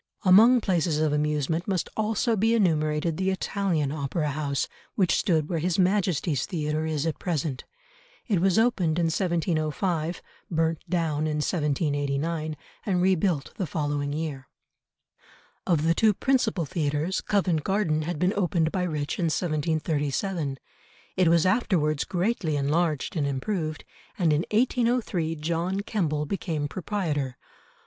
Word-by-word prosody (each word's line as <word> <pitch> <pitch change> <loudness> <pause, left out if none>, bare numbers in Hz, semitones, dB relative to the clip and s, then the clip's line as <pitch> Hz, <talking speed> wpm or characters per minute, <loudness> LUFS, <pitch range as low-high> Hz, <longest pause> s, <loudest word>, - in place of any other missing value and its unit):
Among 225 +7 +7
places 175 -6 +1
of 155 -1 +1
amusement 150 +2 0
must 190 -4 0
also 220 +2 +1
be 225 +3 +2
enumerated 155 -5 +1
the 190 0 0
Italian 190 -6 -1
Opera 150 +1 -2
House, 140 -1 -1 0.3
which 185 -5 +3
stood 160 -5 +1
where 165 -1 -1
His 175 +2 0
Majesty's 180 -7 +1
Theatre 155 -3 -2
is 155 -1 -1
at 160 - -2
present. 155 -6 -2 0.6
It 200 -8 +1
was 190 +1 +3
opened 195 -9 +2
in 170 - +2
1705, 170 -1 -1 0.3
burnt 160 -1 0
down 155 -4 0
in 155 - -1
1789, 150 0 -1 0.3
and 185 -4 0
rebuilt 180 -4 +1
the 185 - -2
following 145 -2 -2
year. 145 -3 -4 1.2
Of 165 -4 +2
the 165 +1 +3
two 215 +3 +3
principal 230 -10 +1
theatres, 155 +2 -1
Covent 180 -7 +1
Garden 190 -6 +1
had 165 +1 -3
been 180 +5 +1
opened 175 -5 +1
by 185 - -1
Rich 150 -5 -2
in 175 - +1
1737, 155 -1 -1 0.6
it 185 -2 +3
was 170 0 +4
afterwards 170 - +1
greatly 180 -4 0
enlarged 155 +4 0
and 145 -4 0
improved, 155 +3 -3 0.3
and 165 -5 +3
in 150 +3 +1
1803 230 -7 +1
John 170 +5 -1
Kemble 155 -8 -1
became 160 -4 -2
proprietor. 150 -8 -2
165 Hz, 135 wpm, -26 LUFS, 150-185 Hz, 1.2 s, Among